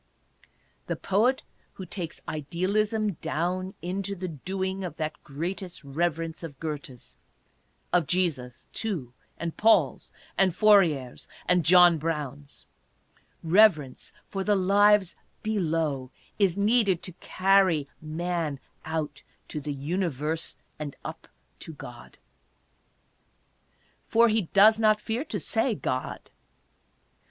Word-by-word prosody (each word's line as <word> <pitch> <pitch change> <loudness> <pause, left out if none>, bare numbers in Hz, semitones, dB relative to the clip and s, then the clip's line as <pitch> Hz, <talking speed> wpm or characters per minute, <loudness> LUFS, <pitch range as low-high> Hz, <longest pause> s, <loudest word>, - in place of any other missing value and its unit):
The - - -1
poet 230 +7 +1 0.3
who 190 - -8
takes 170 -2 -6
Idealism 200 +8 0
down 185 +4 -2
into 195 +2 -3
the 185 0 -5
doing 190 +5 -3
of 180 - -5
that 155 -1 -4
greatest 175 +4 -5
reverence 165 +3 -2
of 155 -5 -8
Goethe's 145 -5 -7 0.4
— - - -41
of 175 -5 +3
Jesus', 155 -10 -1
too, 165 - -3 0.2
and 170 -1 -4
Paul's, 225 +1 +3 0.3
and 185 -3 +4
Fourier's, 175 - +3 0.2
and 180 -1 +3
John 175 -1 +7
Brown's 145 -3 -5 0.4
— - - -35 0.2
reverence 165 -6 +3 0.2
for 195 -1 -3
the 205 +1 +3
lives 200 0 +4 0.3
below, 160 -10 -1 0.3
is 195 -3 +3
needed 200 -3 +2
to 185 - -3
carry 185 -6 +3
man 160 -2 -2 0.2
out 155 -3 -3 0.3
to 150 - -4
the 145 +1 -4
Universe 155 +1 -2 0.2
and 145 -2 -5
up - - -7 0.3
to 160 - -7
God. 120 -5 -11 1.9
For 230 +1 +5
he 215 -6 0
does 215 +2 +6
not 215 -1 +4
fear 225 +5 -2
to - - -4
say, 225 +1 +1
God. 130 -8 -4
175 Hz, 115 wpm, -27 LUFS, 155-195 Hz, 1.9 s, John